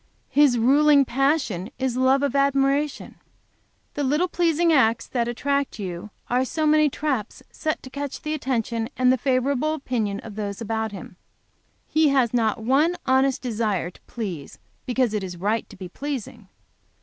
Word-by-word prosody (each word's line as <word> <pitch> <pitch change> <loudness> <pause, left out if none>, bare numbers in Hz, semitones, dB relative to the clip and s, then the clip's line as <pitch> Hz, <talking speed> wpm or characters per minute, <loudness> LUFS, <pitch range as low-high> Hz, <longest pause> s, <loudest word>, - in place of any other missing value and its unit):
"His 280 -3 +4
ruling 280 +4 +5
passion 265 - 0
is 260 -1 -1
love 260 +2 +3
of 280 -1 0
admiration; 275 +1 +1 0.8
the 290 - -2
little 300 +7 +1
pleasing 335 -1 +2
acts 230 -5 +3
that 235 -2 -1
attract 280 +3 -1
you 185 0 -6 0.2
are 250 +1 +1
so 310 +4 -2
many 305 0 +4
traps 270 -7 -3
set 310 -1 -3
to 260 - -9
catch 280 0 -5
the 305 - -2
attention 235 -5 -2
and 255 0 +4
the - - +4
favorable 270 +4 +1
opinion 225 -8 -2
of 225 - -9
those 200 -1 -4
about 220 -1 -2
him. 185 -2 -10 0.7
He 315 0 +3
has 265 -5 +2
not 225 -1 0
one 290 +9 +3
honest 265 +1 +2
desire 215 -7 -1
to - - -21
please 185 - -6 0.3
because 250 -3 +1
it 210 -2 -1
is 180 -2 -6
right 210 +5 -1
to - - -13
be 185 -1 -7
pleasing. 240 -2 -6
260 Hz, 160 wpm, -24 LUFS, 220-285 Hz, 0.8 s, ruling